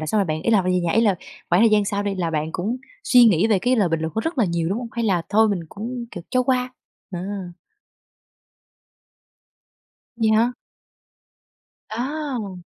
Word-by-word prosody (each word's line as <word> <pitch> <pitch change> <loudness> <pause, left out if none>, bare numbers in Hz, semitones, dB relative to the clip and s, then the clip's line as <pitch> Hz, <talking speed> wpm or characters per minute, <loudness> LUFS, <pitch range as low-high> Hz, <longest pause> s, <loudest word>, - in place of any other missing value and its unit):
là 155 - -4
xong 215 - +1
rồi 200 - +3
bạn 155 -1 -2
ý - - +1
là 215 -3 +5
kh - - -5
phải 185 - +1
về 180 - +2
nhà 170 -1 0
ý 225 - +4
là 210 -4 +3 0.3
khoảng 175 +4 +4
thời 230 - +6
gian 210 -1 +4
sau 200 0 -1
đi 200 -1 -2
là 175 -3 -2
bạn 155 0 -2
cũng 210 +7 -2 0.3
suy 250 -11 +6
nghĩ 200 -4 +4
về 215 -3 +3
cái 250 +7 +1
lời 205 -6 +3
bình 165 -1 -1
luận 160 0 -3
của 220 - 0
rất 325 +3 -3
là 235 - +4
nhiều, 170 -2 -1
đúng 200 +6 -1
hông? 245 - -6
Hay 235 -1 -2
là 185 -6 +1
thôi 220 +2 +4
mình 200 -4 -1
cũng, 235 +6 -6
kiểu, 175 - -8
cho 255 - +2
qua? 250 0 0 0.4
Đó. 180 -3 -5 3.0
Vậy 225 -2 +2
hả? 225 +3 +3 1.4
À. 245 -5 -4
210 Hz, 210 wpm, -22 LUFS, 180-235 Hz, 3.0 s, thời